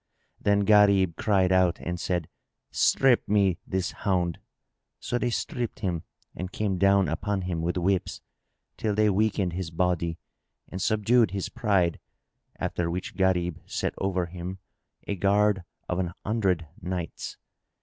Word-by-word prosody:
Then 100 0 +2
Gharib 100 -4 +5
cried 95 -3 +2
out 90 -2 +3
and 85 0 -4
said, 85 -2 -1 0.4
"Strip 130 -3 +3
me 100 -4 +3
this 95 0 -1
hound!" 90 -4 -1 0.6
So 120 - -2
they 125 - 0
stripped 120 0 -3
him 90 -5 -1 0.3
and 90 +1 -5
came 100 -3 -1
down 100 0 +4
upon 100 -3 -2
him 90 -2 -2
with 85 +2 -1
whips, 95 +1 0 0.6
till 105 -2 -1
they 105 0 +4
weakened 100 -3 +1
his 90 -1 -3
body 85 -1 0 0.5
and 95 - -6
subdued 110 +2 +3
his 100 0 -3
pride, 100 -8 +1 0.6
after 85 -1 -2
which 90 +2 -4
Gharib 90 -3 +1
set - - -2
over 95 -2 0
him 90 +2 -6 0.5
a - - -2
guard 100 0 +2 0.2
of 90 - -1
an 90 -2 -2
hundred 95 -7 0
knights. 90 -1 -5
95 Hz, 140 wpm, -27 LUFS, 90-105 Hz, 0.6 s, Gharib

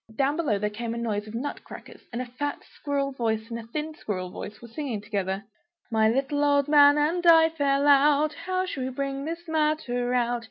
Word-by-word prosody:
Down 275 +3 +1
below 300 -11 0
there 210 +1 -2
was 210 - -13
a 230 0 -3
noise 215 -3 -2
of 215 - -8
nut 280 +5 -4
crackers, - - -12
and 240 +1 -3
a - - -8
fat 270 +4 -4
squirrel 280 -1 -3
voice 225 -3 -2
and 230 - -3
a 225 - -10
thin 305 +5 -4
squirrel 185 -9 -5
voice 210 +3 -8
were 240 - -11
singing 235 -2 -4
together 200 -2 -3 0.5
"My 220 -1 +3
little 275 +4 0
old 285 -1 +3
man 290 -1 +7
and 325 +4 +1
I 325 -1 +7
fell 285 -3 +1
out, 290 +2 +5
How 370 0 -2
shall 285 -7 -5
we 260 - -2
bring 275 +1 -3
this 335 +2 -6
matter 305 -6 0
about? 245 -1 +1
275 Hz, 210 wpm, -26 LUFS, 230-295 Hz, 0.5 s, man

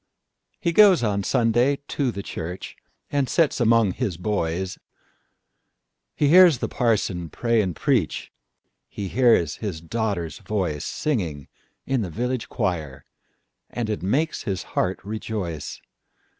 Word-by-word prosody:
He 170 - 0
goes 195 - +6
on 100 -2 +1
Sunday 120 +5 +2
to 140 -3 0
the 100 -4 -5
church, 90 +1 -6 0.4
And 140 -2 +1
sits 165 -5 +2
among 115 -3 +4
his 100 -4 -3
boys; 95 -2 -2 1.4
He 145 - +2
hears 175 -3 +8
the - - -2
parson 100 -8 0
pray 115 +3 +1
and 90 -5 -2
preach, 125 - 0 0.6
He 100 -2 -5
hears 115 - +3
his 100 -7 -4
daughter's 90 -2 -3
voice, 90 -7 -2
Singing 85 - -2 0.4
in 135 -2 0
the 95 - -3
village 125 +6 -3
choir, 80 - -3 0.6
And 115 -3 -3
it 105 - -3
makes 140 - 0
his 95 -2 -3
heart 90 +1 0
rejoice. 100 -7 -4
105 Hz, 130 wpm, -24 LUFS, 90-125 Hz, 1.4 s, hears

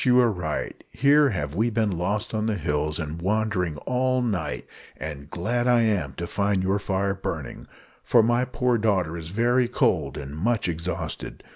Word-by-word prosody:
you 125 -1 +5
are 120 -2 +4
right; 85 -6 -4
here 145 +1 +4
have 75 - -3
we 110 +7 +1
been 110 -2 +1
lost 100 +6 -2
on 110 0 0
the 110 - +1
hills, 75 -3 -1
and 80 0 -5
wandering 95 -5 0
all 130 0 +1
night; 95 -12 -2 0.3
and 75 -2 -7
glad 120 +9 -1
am 110 - +3
I - - -19
to 85 +6 -4
find 100 +1 0
your 95 +2 +1
fire 100 0 0
burning, 95 - -5 0.4
for 115 - +5
my 120 +2 +2
poor 125 -1 0
daughter 95 -7 +1
is 80 -1 -6
very 120 +5 +2
cold 95 - +1
and 70 0 -6
much 110 +7 0
exhausted. 85 +1 -4
100 Hz, 175 wpm, -25 LUFS, 85-120 Hz, 0.4 s, you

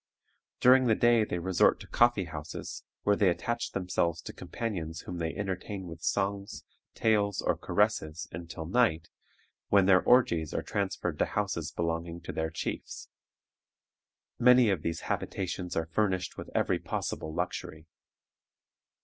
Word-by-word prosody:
During 130 0 +6
the 110 - +4
day 120 -1 +4
they 95 - -2
resort 90 +1 +3
to - - -10
coffee 120 -5 +3
houses, 80 -1 -7 0.2
where 105 - +3
they 100 -2 +4
attach 120 +6 -2
themselves 85 -2 0
to - - -7
companions 85 -8 -4
whom 90 -1 -6
they 80 -1 -1
entertain 95 0 -4
with 85 -1 -9
songs, 100 +2 -2 0.3
tales, 105 -3 +2
or - - +1
caresses 80 +2 0
until 80 -1 -7
night, 85 -4 +2 0.6
when 100 -2 +5
their 95 -1 +6
orgies 85 - +3
are - - -1
transferred - - -2
to - - +4
houses 95 -6 -2
belonging 85 0 -2
to 85 - -6
their 80 0 -2
chiefs. 80 - -5 1.3
Many 125 -2 +6
of 95 -5 -1
these 85 +1 -3
habitations 90 -2 -3
are 80 - 0
furnished 95 +1 -1
with - - -8
every - - +2
possible 80 - -4
luxury. 80 0 -4
90 Hz, 140 wpm, -30 LUFS, 85-105 Hz, 1.3 s, During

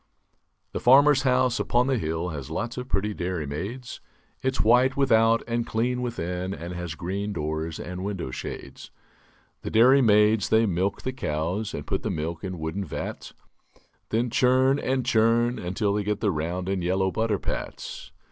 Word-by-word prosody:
C - - -42 0.7
he - - -2
farmer's 140 +2 +6
house 125 -2 +2
upon 120 +1 +2
the 135 -2 +1
hill 80 0 -2
Has 70 -3 -6
lots 120 +9 -3
of 125 0 -6
pretty 105 +2 0
dairy 90 -4 -3
maids; 100 - -6 0.4
It's 130 0 0
white 125 +4 +4
without 115 -4 +4
and 120 0 0
clean 125 +3 -1
within 95 -6 -3
And 85 +3 -7
has 90 -3 -5
green 100 +5 -3
doors 80 0 -3
and 90 +1 -6
window 95 -9 -4
shades. - - -7 0.7
The - - -5
dairy 130 +5 +6
maids 105 -2 +4
they 110 +1 +4
milk 95 +1 -1
the 130 - -2
cows 90 0 -2
And - - -6
put - - -2
the - - -3
milk 80 +3 -3
in 95 -2 -4
wooden 80 +5 -3
vats; 85 - -6 0.7
Then 115 +2 0
churn 130 +3 +3
and 130 -1 -1
churn 120 0 +2
until 95 +3 -1
they 105 0 0
get 105 0 -1
The 105 -3 +1
round 85 +3 -3
and 95 -2 -1
yellow 95 +2 +1
butter 110 -1 0
pats. - - -6
105 Hz, 175 wpm, -26 LUFS, 90-120 Hz, 0.7 s, farmer's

